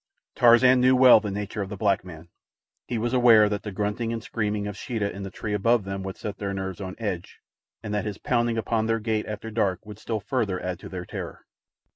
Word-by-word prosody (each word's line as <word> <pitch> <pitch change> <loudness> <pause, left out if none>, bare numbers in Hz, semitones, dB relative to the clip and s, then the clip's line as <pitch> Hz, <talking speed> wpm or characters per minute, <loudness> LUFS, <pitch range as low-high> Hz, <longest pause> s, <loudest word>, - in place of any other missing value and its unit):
Tarzan 125 +1 +6
knew 130 +1 +5
well 125 -2 +8
the 105 -1 -4
nature 105 +1 -4
of 95 - -4
the 105 - -6
black 100 -1 +1
man. 85 -2 -11 0.6
He 120 - -2
was 120 +2 -1
aware 115 -4 +6
that 105 0 -2
the 105 - -6
grunting 105 +3 -2
and 115 -1 -4
screaming 105 -3 -2
of 105 -1 -5
Sheeta 105 -3 -3
in 100 - -7
the 95 - -5
tree 105 +2 -5
above 115 +2 +2
them 95 0 -5
would 95 0 -6
set 100 -2 -6
their 100 -1 -3
nerves 95 0 -5
on 95 -1 -6
edge, 100 -6 -4 0.5
and 105 - -4
that 105 0 -1
his 105 -2 -4
pounding 120 -2 0
upon 110 0 0
their 115 0 +1
gate 110 -1 -2
after 105 +1 -6
dark 100 -5 -1
would 105 -1 -10
still 110 -2 -3
further 105 -4 -1
add 90 -1 -4
to - - -10
their 90 -1 -6
terror. - - -7
105 Hz, 230 wpm, -25 LUFS, 100-115 Hz, 0.6 s, well